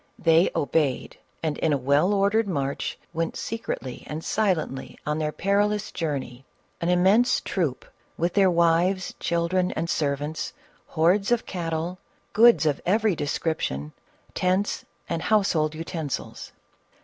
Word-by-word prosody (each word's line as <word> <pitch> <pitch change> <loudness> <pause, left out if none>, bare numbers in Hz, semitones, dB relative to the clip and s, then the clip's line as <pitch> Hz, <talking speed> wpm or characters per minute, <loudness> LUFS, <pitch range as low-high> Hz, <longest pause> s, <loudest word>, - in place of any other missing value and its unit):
They 165 +1 +4
obeyed, 145 -3 0 0.2
and 155 -2 -1
in 160 - +2
a - - +2
well 140 +8 +2
ordered 205 +2 +2
march 140 -6 -2 0.2
went 165 0 -2
secretly 175 - -5
and 155 +2 -5
silently 175 -10 -1
on 150 +1 -1
their 155 -1 -1
peril 200 +5 +1
ous 210 0 -4
journey, 135 -6 -4 0.2
— - - -40
an 170 - 0
immense 195 +8 +4
troop, 160 -9 -2 0.3
with 170 +2 0
their 195 -2 +5
wives, 170 +2 +2
children 170 +2 0
and 165 - -2
servants, 150 +1 -2 0.3
hordes 180 +6 +2
of 240 - +2
cattle, 170 0 -3 0.3
goods 230 -5 +6
of 145 -2 +1
every 210 +1 +2
description, 145 - -2 0.4
tents, 185 +3 0 0.2
and 165 -1 -2
household 165 -8 +2
utensils. 160 -3 -5
170 Hz, 135 wpm, -25 LUFS, 150-195 Hz, 0.4 s, goods